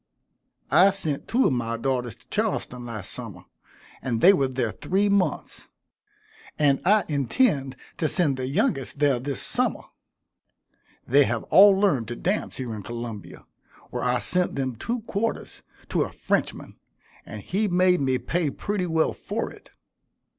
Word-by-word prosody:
I 190 +2 +7
sent 160 -8 -2
two 255 +3 +2
of - - +3
my 115 -1 -2
daughters 125 -3 -2
to - - -28
Charleston 125 -1 -2
last 110 -4 -6
summer, - - -8 0.6
and 120 -3 -2
they 190 - +7
were 140 -8 +2
there 125 -3 -2
three 200 - 0
months; 200 -2 -1 0.9
and 140 -3 +3
I 210 +3 +4
intend 140 - +1 0.2
to 160 - 0
send 155 -5 +1
the 130 -1 -3
youngest 135 0 -1
there 140 -3 +2
this 135 +2 -4
summer. - - 0 1.2
They 140 +2 +5
have 115 0 -2
all 195 0 +8
learned 145 - +2
to 120 - -5
dance 190 - -2
here 125 -3 -4
in 105 - -6
Columbia, 115 -1 -7 0.5
where - - -3
I 125 0 +2
sent 180 +7 0
them 130 -3 -2
two 235 - -3
quarters 225 0 -3 0.3
to - - +1
a - - -1
Frenchman, - - -2 0.4
and - - -9
he 205 +3 0
made 180 -2 +3
me 130 -1 +1
pay 165 +3 -1
pretty 195 +4 -3
well 160 -1 +1
for - - -4
it. - - -16
140 Hz, 155 wpm, -25 LUFS, 125-185 Hz, 1.2 s, all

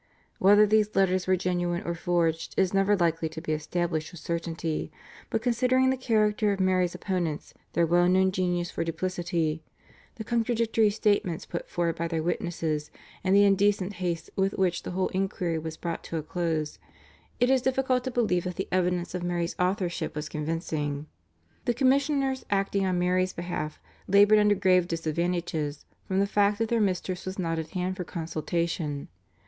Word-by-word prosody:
Whether 205 +2 +7
these 215 0 +2
letters 185 -1 +2
were 185 - +4
genuine 175 -1 -1
or 170 - -2
forged 170 -1 0
is 190 -1 +2
never 195 +1 +3
likely 165 -2 +1
to 160 0 -7
be 160 -1 -4
established 160 +1 -2
with 175 - -10
certainty, 165 -1 -3 0.4
but 225 -2 -1
considering 255 +2 +3
the - - +1
character 215 -4 +2
of 195 - -2
Mary's 185 -2 +2
opponents, 175 -6 -3 0.2
their 170 +1 +3
well 175 +2 +3
known 190 +1 +4
genius 175 -2 -1
for - - -2
duplicity, 165 -2 -2 0.5
the 220 - -6
contradictory 230 -1 +2
statements 200 -5 0
put 170 - -6
forward 170 -1 -1
by 170 - -1
their 165 -1 -2
witnesses 160 -3 -2 0.3
and 190 +1 +3
the 200 - +7
indecent 200 0 +3
haste 170 -2 -2
with 195 0 +1
which 180 -2 0
the - - -6
whole 185 +1 -1
enquiry 185 -3 -1
was 160 0 -6
brought 170 -1 -4
to 165 - -4
a 155 - -3
close, 155 - -2 0.6
it 245 +2 +3
is 265 -1 +4
difficult 260 -1 +1
to 260 - -2
believe 215 -8 +1
that 180 -1 -3
the 190 - -3
evidence 180 -1 0
of 180 - -3
Mary's 175 -1 -2
authorship 180 -3 -1
was 150 0 -3
convincing. 150 -2 -3 0.6
The 240 - +1
commissioners 270 +1 +2
acting 195 -1 +1
on 185 -1 0
Mary's 185 +1 +1
behalf 170 -3 -4 0.3
laboured 205 +2 +6
under 210 0 +4
grave 185 -2 +3
disadvantages 165 -2 -2 0.2
from 190 -1 0
the 200 - +3
fact 205 0 +2
that 225 0 -1
their 235 -1 +2
mistress 185 -2 -1
was 185 0 -5
not 165 -3 -1
at 160 -1 -5
hand 185 0 -2
for 180 - -3
consultation. 165 -2 -3
180 Hz, 175 wpm, -27 LUFS, 165-205 Hz, 0.6 s, Whether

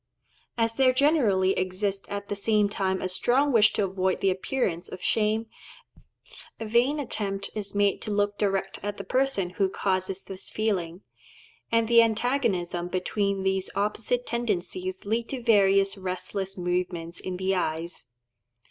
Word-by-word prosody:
As 230 -1 +1
there 255 +1 +4
generally 250 - +3
exists 195 +1 -1
at 200 0 -4
the 205 - -3
same 210 0 +2
time 190 -2 -1
a - - 0
strong 250 +10 +2
wish 220 -4 +5
to - - +1
avoid 190 -1 0
the 195 - +2
appearance 185 -3 -2
of 185 - -7
shame, 220 +3 +1 1.1
a 225 - -4
vain 240 +7 +2
attempt 200 -7 -3
is 205 -2 -5
made 200 -1 +2
to - - -5
look 205 0 +1
direct 195 -1 -1
at 205 +1 -4
the - - -5
person 255 -9 +1
who 190 +1 +1
causes 190 0 -1
this 190 -1 -7
feeling; 190 -5 -2 0.7
and 230 -1 +3
the 235 0 +7
antagonism 220 -7 0
between 195 +2 -1
these 190 0 0
opposite 215 +4 -1
tendencies 190 -5 -3
leads 225 +3 -1
to 260 -3 -4
various 195 -3 +4
restless 190 +1 -4
movements 175 -1 -2
in 185 -1 -5
the 190 +1 0
eyes. 170 -1 -3
200 Hz, 150 wpm, -27 LUFS, 185-225 Hz, 1.1 s, the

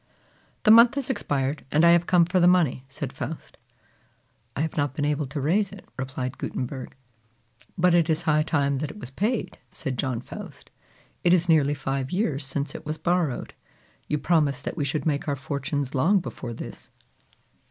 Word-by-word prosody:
"The 215 - +6
month 235 +3 +8
has 275 -2 -1
expired, 140 - -2
and 155 +3 +4
I 170 - +8
have 170 0 +4
come 175 -2 +5
for 180 +2 +1
the 175 - +5
money!" 170 -8 +3
said 135 0 -6
Faust. 145 +5 -6 1.0
"I - - -1
have 160 0 -2
not 145 -2 -1
been 145 - -1
able 150 -1 0
to 145 +3 -4
raise 185 +8 +1
it," 200 -2 -12
replied 130 -1 -4
Gutenberg. 130 0 -5 0.8
"But 180 0 +4
it 170 -1 +3
is 160 +1 +1
high 155 -1 +3
time 140 -3 +1
that 150 0 -3
it 155 - -10
was 135 -11 -8
paid," 215 - -2
said 130 -2 -5
John 130 -4 -1
Faust. 120 - -10 0.5
"It 175 0 +6
is 175 0 +1
nearly 150 -3 +4
five 135 -1 -3
years 165 -7 0
since 140 +2 -2
it - - -8
was 155 +1 -4
borrowed. 170 -7 -1 0.5
You 150 - 0
promised 145 -3 +1
that - - -4
we 150 -4 -1
should 140 +1 -2
make 145 -2 0
our 145 - 0
fortunes 140 0 -3
long 170 +10 +3
before 125 -9 -6
this." - - -9
150 Hz, 185 wpm, -25 LUFS, 135-175 Hz, 1.0 s, month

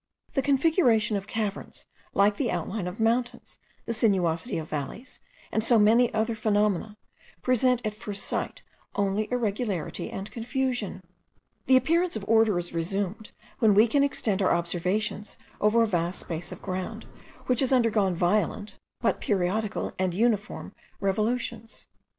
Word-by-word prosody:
The 270 - +2
configuration 265 - +3
of 200 0 -3
caverns, 210 -2 -4 0.3
like 205 +1 +4
the 250 - 0
outline 180 +2 -3
of 180 +4 -6
mountains, 235 +2 -1 0.3
the 230 - -2
sinuosity 190 -3 +1
of 160 -1 -4
valleys, 155 - -6 0.3
and 220 - +1
so 235 0 +4
many 230 +3 +5
other 220 +1 0
phenomena, 210 -1 0 0.5
present 250 0 +2
at 215 - -1
first 205 -2 -5
sight - - -3 0.3
only 200 +1 0
irregularity 215 -7 -2
and 195 +2 -6
confusion. 245 -4 -2 0.6
The 260 - +7
appearance 335 +7 +1
of 205 - -4
order 220 -3 +4
is 175 0 -4
resumed, 195 +5 -2 0.3
when 215 -3 +5
we 215 +3 +7
can 280 +5 +2
extend 215 -8 0
our 185 - +3
observations 185 +5 -2 0.2
over 220 +2 +4
a - - +4
vast 175 -3 -1
space 165 0 -4
of - - -9
ground, 190 +4 -4 0.4
which 250 -2 +1
has 265 -1 +2
undergone 220 -7 +3
violent, 205 +3 0 0.2
but 235 - +1
periodical 205 +2 -1
and 185 -2 0
uniform 215 -1 0 0.3
revolutions. 220 +3 -2
215 Hz, 145 wpm, -27 LUFS, 195-235 Hz, 0.6 s, The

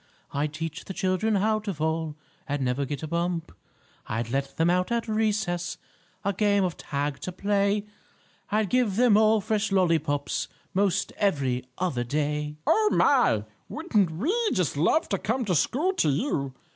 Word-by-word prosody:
I'd 145 +1 -1
teach 160 0 -5
the 190 - -7
children 195 +3 +1
how 215 +2 +2
to 205 -3 -4
fall, 160 0 -1 0.3
And 145 -2 -1
never 125 +3 0
get 145 +3 -5
a - - -3
bump. 170 +1 -2 0.6
I'd 115 +2 -3
let 135 +1 -2
them 165 - +3
out 180 +4 +1
at 235 0 0
recess, 210 -5 0 0.5
A 200 - +1
game 200 -1 +2
of 180 -3 -1
tag 145 0 -3
to 185 - -5
play; 200 +2 +1 0.6
I'd 210 -1 0
give 245 -6 +2
them 240 -1 +5
all 215 0 +4
fresh 215 0 -1
lollypops 160 -6 +1 0.3
'Most 195 -1 +1
every 135 -10 0
other 170 -10 -1
day!" 150 +3 -2
"Oh, 430 -1 +4
my! 245 - +4 0.3
Wouldn't 225 - +1
we 210 - -1 0.2
just 180 -7 0
love 170 - +2
to 195 - 0
come 240 +3 -1
to 190 - +1
school 300 - +1
to 160 - +2
you!" 140 - -1
180 Hz, 165 wpm, -26 LUFS, 150-215 Hz, 0.6 s, them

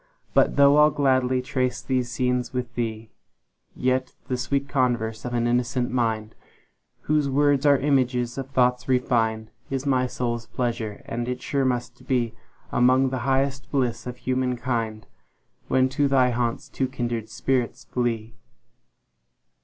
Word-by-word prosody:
But - - +3
though 140 +1 +6
I'll 150 0 +7
gladly 130 -3 +1
trace 130 -1 -1
these 125 -2 -1
scenes 125 0 -1
with 125 -1 -3
thee, 110 -2 -4 0.6
Yet 130 0 0
the 130 - +1
sweet 135 +3 -1
converse 120 -5 0
of 120 0 -3
an 120 0 +1
innocent 125 +1 0
mind, 115 -3 -1 0.7
Whose 150 -2 +1
words 145 +1 +3
are 140 -1 +6
images 125 -3 +1
of 135 0 -5
thoughts 125 -1 +2
refin'd, 115 -4 +1 0.2
Is 135 0 -3
my 130 -2 +2
soul's 120 -2 -3
pleasure; 115 -4 -3
and 120 +1 -3
it 125 0 -3
sure 140 -1 -1
must 125 0 -2
beAlmost 125 +1 +1
the 130 - -2
highest 135 +1 0
bliss 125 -4 -1
of 125 0 -6
human 130 0 -1
kind, 115 -4 -2 0.6
When 130 0 +3
to 140 +2 +1
thy 130 -2 +3
haunts 120 +3 -2
two 130 0 -2
kindred 120 -4 -3
spirits 125 +2 -1
flee. 115 -3 -2
125 Hz, 145 wpm, -24 LUFS, 120-130 Hz, 0.7 s, I'll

